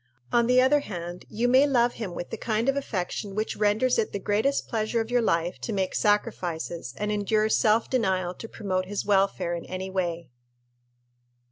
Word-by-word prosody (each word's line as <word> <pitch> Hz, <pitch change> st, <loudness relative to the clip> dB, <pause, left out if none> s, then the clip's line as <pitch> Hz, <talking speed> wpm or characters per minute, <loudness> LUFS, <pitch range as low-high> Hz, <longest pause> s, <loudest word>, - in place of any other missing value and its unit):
On 235 Hz, -1 st, +4 dB
the 250 Hz, +1 st, +5 dB
other 265 Hz, +3 st, +5 dB
hand, 175 Hz, -8 st, -7 dB
you 230 Hz, +3 st, 0 dB
may 260 Hz, +3 st, +5 dB
love 245 Hz, -3 st, +3 dB
him 195 Hz, -7 st, -6 dB
with 175 Hz, -, -6 dB
the -, -, -2 dB
kind 225 Hz, +1 st, -1 dB
of 275 Hz, -, +3 dB
affection 200 Hz, -5 st, -3 dB
which 215 Hz, +1 st, -2 dB
renders 215 Hz, +4 st, +2 dB
it 220 Hz, -, -1 dB
the -, -, -1 dB
greatest 210 Hz, +8 st, 0 dB
pleasure 225 Hz, 0 st, -1 dB
of 225 Hz, +1 st, -3 dB
your 245 Hz, 0 st, +3 dB
life 170 Hz, -5 st, 0 dB
to -, -, -4 dB
make 190 Hz, -3 st, -1 dB
sacrifices 175 Hz, -, -1 dB
and 210 Hz, 0 st, -2 dB
endure 215 Hz, +1 st, +1 dB
self 220 Hz, +1 st, +3 dB
denial 190 Hz, -8 st, 0 dB
to 225 Hz, -, -9 dB
promote 185 Hz, -3 st, -2 dB
his 205 Hz, +1 st, -3 dB
welfare 195 Hz, -3 st, +2 dB
in 170 Hz, -, -4 dB
any 185 Hz, +1 st, -5 dB
way. 170 Hz, -5 st, -2 dB
210 Hz, 190 wpm, -26 LUFS, 185-230 Hz, -, the